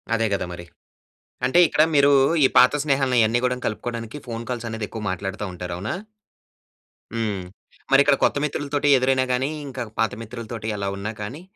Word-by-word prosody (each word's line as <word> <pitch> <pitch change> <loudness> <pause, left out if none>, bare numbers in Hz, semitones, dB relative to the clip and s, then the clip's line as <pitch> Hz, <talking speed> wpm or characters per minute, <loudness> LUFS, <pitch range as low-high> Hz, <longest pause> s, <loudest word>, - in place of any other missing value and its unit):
అదే 115 0 +1
కదా! 95 -2 -1
మరి. 85 0 -9 0.8
అంటే 130 +7 +4
ఇక్కడ 155 - +3
మీరు, 140 0 +6 0.3
ఈ - - +7
పాత 125 +3 +7
స్నేహాలను 135 -3 +1
ఇయన్నీ 110 +2 +3
కూడా 125 - +1
కలుపుకోవడానికి 115 +2 -5
ఫోన్ 115 0 -5
కాల్స్ 120 -2 -3
అనేది 110 -1 -4
ఎక్కువ 110 - -6
మాట్లాడతా 95 +3 -4
ఉంటారు. 90 0 -6
అవునా? 95 +4 -3 1.2
హ్మ్. 105 -5 -2 0.6
ఇక్కడ 140 0 +4
కొత్త - - +3
మిత్రులతోటి 145 0 -1
ఎదురైనా 130 0 +2
గాని, 125 +2 +1 0.2
ఇంకా 130 -2 -5 0.2
పాత 115 - +2
మిత్రులతోటి 115 -1 -7
ఎలా 100 -1 -3
ఉన్నా 105 +2 -4
కానీ, 125 +10 -6
115 Hz, 160 wpm, -23 LUFS, 110-130 Hz, 1.2 s, ఈ